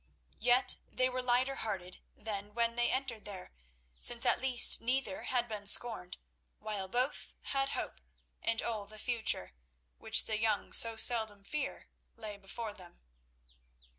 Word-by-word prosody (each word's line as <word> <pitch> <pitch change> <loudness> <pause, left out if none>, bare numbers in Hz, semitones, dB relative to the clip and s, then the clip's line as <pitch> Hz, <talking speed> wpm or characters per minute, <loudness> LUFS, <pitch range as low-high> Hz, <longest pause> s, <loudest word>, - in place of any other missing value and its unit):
Yet 245 +1 +3
they 255 0 +1
were 255 0 -2
lighter 255 +2 +1
hearted 190 -4 -5 0.2
than 210 -1 -6
when 235 0 +1
they 240 0 +2
entered 255 -5 -2
there, 190 -3 -9 0.5
since 235 -1 +2
at - - +4
least 260 -2 +6
neither 270 +5 -2
had 245 -2 +1
been 210 -2 -7
scorned, 205 -5 0 0.4
while 210 -3 -3
both 250 +7 -2
had 275 0 0
hope, - - -5 0.4
and 230 -1 -1
all 220 -3 -3
the 215 +1 -11
future, 220 - -2 0.5
which - - +6
the 215 -1 -2
young 215 -1 0
so 230 -1 +6
seldom 220 -3 +4
fear, 300 +9 -5 0.3
lay 210 -2 -7
before 205 +2 -7
them. 180 -4 -15
230 Hz, 145 wpm, -33 LUFS, 205-245 Hz, 0.5 s, least